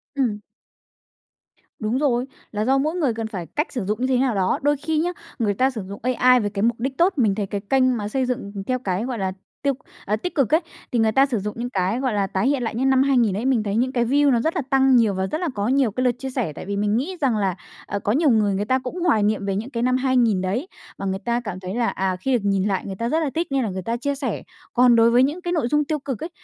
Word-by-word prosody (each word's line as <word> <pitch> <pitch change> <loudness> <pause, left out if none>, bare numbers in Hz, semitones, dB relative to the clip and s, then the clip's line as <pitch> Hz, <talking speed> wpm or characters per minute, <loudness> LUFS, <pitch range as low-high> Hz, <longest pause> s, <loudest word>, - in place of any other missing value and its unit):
Ừm. 230 -7 0 1.4
Đúng 220 +3 -1
rồi, 255 -4 +1 0.3
là 210 0 -1
do 270 +2 +3
mỗi 310 +5 0
người 285 -10 +1
cần 225 0 -4
phải 185 -6 -5
cách 300 +4 +1
sử 245 -8 -3
dụng 210 +3 -1
như 255 - +2
thế 260 -1 +2
nào 250 -4 +1
đó. 185 -1 +1
Đôi 290 0 +2
khi 310 +2 -2
nhá, 350 +2 0 0.3
người 205 -3 +1
ta 260 +6 +2
sử 230 -5 -5
dụng 200 - -7
AI 250 0 +4
với 205 -3 -1
cái 200 -1 -4
mục 235 0 +1
đích 265 +2 -3
tốt, 370 +3 +4
mình 210 -6 +3
thấy 205 -2 -2
cái 200 +1 -3
kênh 255 +3 +2
mà 205 -2 -3
xây 260 +5 0
dựng 245 -5 -3 0.2
theo 255 0 0
cái, 195 -1 -2
gọi 250 -3 -3
là, 190 -1 -1 0.3
tiêu 280 -1 +2 0.3
à, 210 - +1
tích 295 +13 -5
cực 275 -1 +1
ấy, 320 - +5 0.3
thì 240 - +1
người 220 -1 +3
ta 270 +4 +5
sử 240 -6 -1
dụng 210 +2 -4
những 245 +1 -3
cái, 195 +3 0
gọi 260 -4 0
là, 200 -1 +1
tái 190 +8 0
hiện 275 -3 +1
lại 225 - -3
những 265 +3 +1
năm 265 0 +4
2000 240 -8 +2
ấy, 225 - -3
mình 255 -5 +2
thấy 205 0 -2
những 255 +3 +1
cái 240 -3 +1
view 285 +3 +3
nó 235 -2 +2
rất 320 +6 -1
là 335 - +1
tăng 270 -1 +4
nhiều 225 -4 +4
và 190 0 -1
rất 310 - -3
là 345 - 0
có 205 +1 -1
nhiều 260 -3 +2
cái 255 +4 -2
lượt 250 - +4
chia 265 - -4
sẻ, 245 - -2
tại - - -8
vì 200 +1 -3
mình 210 +2 +1
nghĩ 360 +9 -3
rằng 255 -6 +2
là, 195 -4 0 0.3
ờ, 200 - -3
có 205 - -1
nhiều 295 +4 +3
người 215 -4 +3
người 205 - -1
ta 260 +4 +2
cũng 260 +8 -6
hoài 300 -12 +3
nghiệm 205 -1 0
về 195 -1 -1
những 225 +6 -3
cái 235 -3 -2
năm 255 0 +2
2000 245 -7 +2
đấy, 210 - -2 0.3
và 195 - -5
người 190 0 -1
ta 235 +2 -1
cảm 200 -5 -6
thấy 185 +3 -5
là, 240 -1 +1
à, 190 -1 -1
khi 255 +9 -1
được 245 - +3
nhìn 195 -2 +1
lại 195 -2 -1
người 195 - -5
ta 230 +4 -2
rất 315 +4 +2
là 295 - 0
thích 335 +1 0
nên 270 -2 +1
là 215 - -1
người 190 0 -4
ta 230 +5 -2
chia 280 +3 -2
sẻ. 275 -1 -3 0.3
Còn 245 -1 +5
đối 230 0 +5
với 245 +2 +5
những 300 +7 -1
cái 350 - -3
nội 305 -8 +1
dung 295 +3 +1
tiêu 305 +1 -1
cực 270 -1 -5
ấy, 325 - -4
240 Hz, 300 wpm, -22 LUFS, 205-270 Hz, 1.4 s, ấy